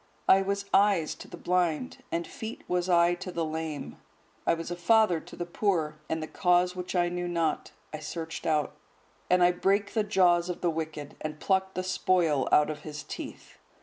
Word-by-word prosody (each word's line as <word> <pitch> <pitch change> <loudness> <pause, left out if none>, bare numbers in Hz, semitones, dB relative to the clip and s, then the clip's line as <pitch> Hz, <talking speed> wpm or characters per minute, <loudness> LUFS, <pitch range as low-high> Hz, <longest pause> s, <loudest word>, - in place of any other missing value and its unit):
I 195 - +7
was 200 +1 -2
eyes 195 -6 +4
to - - -11
the 175 - -10
blind, 165 - 0
and 170 0 -1
feet 225 +1 -7
was 180 0 0
I 170 0 +5
to 185 +1 -6
the 170 -2 -1
lame. 155 - -5 0.5
I - - +4
was 165 +1 -6
a - - -2
father 180 0 +4
to - - -12
the 175 - -4
poor; 170 -5 -1
and 160 0 -1
the - - -5
cause 180 +1 +2
which 180 +1 -5
I 175 -1 +3
knew 175 0 -3
not, 165 -3 -1 0.2
I 155 - -4
searched 160 +1 -5
out. 155 -2 +1 0.6
And 180 0 +5
I 175 - +6
brake 200 +3 +1
the 220 - +2
jaws 180 -4 +3
of 180 - -4
the 175 - +2
wicked, 155 -2 -5
and 155 0 -5
plucked 190 +1 0
the 185 - -1
spoil 180 -6 +1
out 150 +1 +5
of 150 - -7
his 150 -2 -7
teeth." - - -9
175 Hz, 200 wpm, -28 LUFS, 160-185 Hz, 0.6 s, I